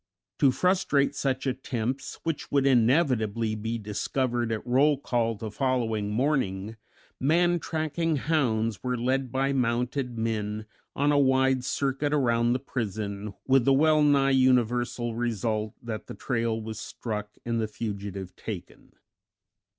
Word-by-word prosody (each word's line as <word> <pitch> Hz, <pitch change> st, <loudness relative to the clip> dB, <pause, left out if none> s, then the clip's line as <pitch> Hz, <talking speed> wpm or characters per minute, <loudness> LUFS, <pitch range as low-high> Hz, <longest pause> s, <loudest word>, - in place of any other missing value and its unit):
To 140 Hz, -, +6 dB
frustrate 150 Hz, -3 st, +2 dB
such 135 Hz, -1 st, -1 dB
attempts, 130 Hz, -1 st, -3 dB
which 165 Hz, -3 st, -3 dB
would 140 Hz, -1 st, +3 dB
inevitably 120 Hz, -4 st, +2 dB
be 110 Hz, +2 st, -3 dB
discovered 120 Hz, +3 st, -1 dB
at 110 Hz, 0 st, -3 dB
roll 135 Hz, +4 st, +3 dB
call 120 Hz, -4 st, 0 dB
the 110 Hz, 0 st, -6 dB
following 115 Hz, -5 st, 0 dB
morning, 110 Hz, -4 st, 0 dB, 0.4 s
man 175 Hz, +5 st, +3 dB
tracking 160 Hz, 0 st, -1 dB
hounds 120 Hz, -8 st, 0 dB
were 125 Hz, -1 st, -1 dB
led 130 Hz, +1 st, 0 dB
by 135 Hz, +1 st, +1 dB
mounted 125 Hz, 0 st, -1 dB
men 110 Hz, -1 st, -2 dB, 0.3 s
on 145 Hz, +1 st, +2 dB
a 145 Hz, -, +4 dB
wide 130 Hz, -1 st, +3 dB
circuit 140 Hz, +2 st, -1 dB
around 120 Hz, -3 st, +2 dB
the 130 Hz, -, 0 dB
prison, 105 Hz, -5 st, -4 dB
with 135 Hz, -1 st, +4 dB
the 135 Hz, -, +4 dB
well 155 Hz, +2 st, +4 dB
nigh 140 Hz, -2 st, +4 dB
universal 125 Hz, -2 st, +2 dB
result 110 Hz, -2 st, -2 dB
that 110 Hz, -3 st, -5 dB
the -, -, -7 dB
trail 115 Hz, -3 st, -1 dB
was 110 Hz, 0 st, -6 dB
struck 105 Hz, -2 st, -5 dB
and 115 Hz, -1 st, 0 dB
the 110 Hz, -, -1 dB
fugitive 100 Hz, -4 st, -5 dB
taken. -, -, -8 dB
125 Hz, 135 wpm, -27 LUFS, 110-135 Hz, 0.4 s, To